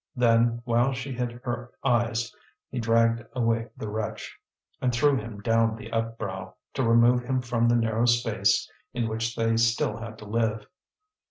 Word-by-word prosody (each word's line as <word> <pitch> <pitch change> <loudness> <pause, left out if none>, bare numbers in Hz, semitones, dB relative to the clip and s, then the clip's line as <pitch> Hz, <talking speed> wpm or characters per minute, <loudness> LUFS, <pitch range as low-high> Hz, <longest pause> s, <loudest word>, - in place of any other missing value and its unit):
Then, 120 -1 +3
while 120 +2 +2
she 130 +2 -5
hid 125 -1 -2
her 120 0 -4
eyes, 120 -2 +1 0.4
he 125 - -3
dragged 115 0 +2
away 115 -2 0
the 110 - -5
wretch, 105 +1 -4 0.5
and 125 - +2
threw 140 +4 +3
him 105 -4 -5
down 115 +1 +2
the 110 0 -10
upbrow, 110 -5 -3 0.2
to 135 - -1
remove 115 +1 +5
him 130 +1 0
from 120 -1 +1
the 120 - +4
narrow 115 0 +1
space 120 0 +2 0.3
in 120 -2 0
which 115 +1 -2
they 115 0 +1
still 115 0 +2
had 115 -1 -8
to 105 - -11
live. 110 0 -1
115 Hz, 165 wpm, -26 LUFS, 115-120 Hz, 0.5 s, remove